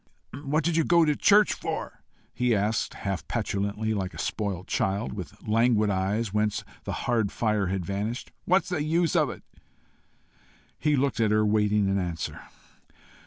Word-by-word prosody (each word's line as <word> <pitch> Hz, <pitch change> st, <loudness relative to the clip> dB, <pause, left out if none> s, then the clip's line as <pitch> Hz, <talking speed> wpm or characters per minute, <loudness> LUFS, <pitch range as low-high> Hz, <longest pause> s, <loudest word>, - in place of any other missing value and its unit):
"What 150 Hz, +3 st, +1 dB
do 170 Hz, -, +1 dB
you 165 Hz, 0 st, +2 dB
go 170 Hz, 0 st, +4 dB
to 150 Hz, -1 st, +2 dB
church 210 Hz, +5 st, +5 dB
for?" -, -, -5 dB, 0.3 s
he 125 Hz, -2 st, +1 dB
asked, 105 Hz, +2 st, 0 dB
half 95 Hz, -6 st, -4 dB
petulantly, 100 Hz, +2 st, -1 dB
like 95 Hz, -3 st, -3 dB
a -, -, -9 dB
spoilt 100 Hz, -4 st, -3 dB
child, 100 Hz, +4 st, -1 dB
with 105 Hz, +2 st, -9 dB
languid 110 Hz, -1 st, +3 dB
eyes 100 Hz, +3 st, -1 dB
whence 105 Hz, -1 st, 0 dB, 0.2 s
the -, -, -3 dB
hard 115 Hz, -5 st, +1 dB
fire 105 Hz, -4 st, 0 dB
had 95 Hz, -1 st, -2 dB
vanished. 105 Hz, +6 st, -3 dB
"What's 185 Hz, 0 st, +2 dB
the 180 Hz, -5 st, -1 dB
use 165 Hz, +1 st, +1 dB
of -, -, +3 dB
it?" -, -, -8 dB, 1.4 s
He 150 Hz, -1 st, +2 dB
looked 135 Hz, -3 st, 0 dB
at 110 Hz, -2 st, +3 dB
her, 105 Hz, 0 st, +3 dB
waiting 105 Hz, -1 st, +2 dB
an 95 Hz, 0 st, +1 dB
answer. 85 Hz, -3 st, -4 dB
105 Hz, 165 wpm, -27 LUFS, 100-135 Hz, 1.4 s, church